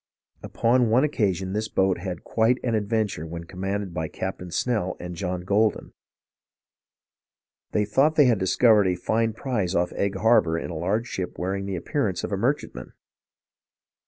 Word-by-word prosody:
Upon 120 0 +2
one 120 +5 +4
occasion 95 - 0
this 110 +1 -1
boat 95 -2 +1
had 90 -2 -5
quite 115 +2 +2
\_sic~\ - - -2
an - - 0
adventure 105 -6 -1
when 85 +1 -6
commanded 95 +2 -4
by 80 -1 -2
Captain 90 +1 -5
Snell 100 0 -1
and 90 0 -6
John 90 0 -3
Goldin. 105 +3 +1 1.8
They 105 - +1
thought 135 +9 +2
they 150 - +6
had 120 -5 +3
discov 105 +3 +4
ered 95 - +2
a - - -1
fine 110 +5 0
prize 110 -7 -2
off 90 +1 +1
Egg 100 0 -1
Harbor 95 -6 +3
in 85 - -5
a - - -6
large 100 +8 -1
ship 95 -6 -5
wearing 95 +2 -3
the 95 - -3
appearance 85 - -2
of - - -4
a - - +1
merchantman. 60 0 -2
100 Hz, 170 wpm, -25 LUFS, 90-110 Hz, 1.8 s, they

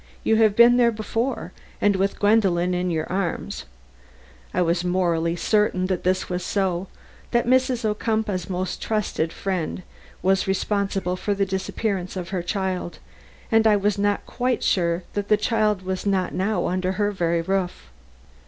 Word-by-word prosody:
You 220 - +3
have 215 -2 +4
been 235 +2 +7
there 235 -1 +4
before, 225 +4 -3 0.3
and 205 -1 +3
with 195 +1 0
Gwendolen 190 -4 +3
in 180 0 0
your 160 -2 -1
arms," 185 -2 -3 0.9
I 180 - +1
was 170 +1 +1
morally 170 -2 +1
certain 210 -1 +1
that 185 -2 -2
this 185 +1 +1
was 180 0 -3
so; 190 -1 -1 0.4
that 240 -1 +1
Mrs. 255 -1 +2
Ocumpaugh's 215 -3 -1
most 185 0 -3
trusted 210 -7 -1
friend 185 -2 -3 0.4
was 190 +1 +2
responsible 195 -1 0
for 200 +2 -1
the 200 0 +1
disappearance 190 0 -2
of 180 -2 -5
her 190 -2 -2
child, 185 -1 -3 0.5
and 225 0 +5
I 215 - +5
was 205 0 0
not 205 0 0
quite 250 0 -1
sure 170 -1 +1
that 205 -1 -2
the 210 - +4
child 215 -3 +1
was 185 +1 -3
not 190 -2 +1
now 190 0 0
under 185 +1 0
her 205 +2 0
very 170 -3 0
roof. 180 - -2
195 Hz, 160 wpm, -23 LUFS, 180-210 Hz, 0.9 s, been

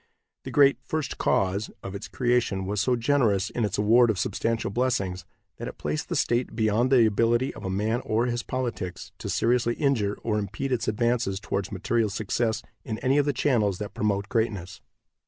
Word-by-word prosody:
The - - -4
great 140 -1 +5
"First 155 -3 -3
Cause" 95 +2 +1
of 95 - -6
its 100 - -6
creation 120 -6 0
was 100 +1 -1
so 125 +3 +2
generous 115 -6 +2
in 115 - -1
its 105 -1 -1
award 115 +3 +5
of 110 - +1
substantial 115 0 -1
blessings 100 -7 -1 0.3
that - - -5
it - - -8
placed 75 0 -3
the - - -1
state 120 -1 0
beyond 110 +3 +2
the 125 -4 +6
ability 115 +4 +2
of 95 - -5
man 110 +5 0
or 110 +2 +1
his 120 -1 -1
politics 120 -9 -4
to - - -5
seriously 120 0 +1
injure 120 -9 +1
or 105 -2 0
impede 110 +7 -4
its 120 -3 0
advance 120 +2 +1
towards 100 -1 -3
material 110 +3 0
success 110 +2 -1 0.2
in 110 - -4
any 135 +4 +2
of 145 - +1
the - - +3
channels 115 -8 +1
that 105 0 -6
promote 100 -1 0
greatness. 100 -6 -2
115 Hz, 185 wpm, -26 LUFS, 100-120 Hz, 0.3 s, the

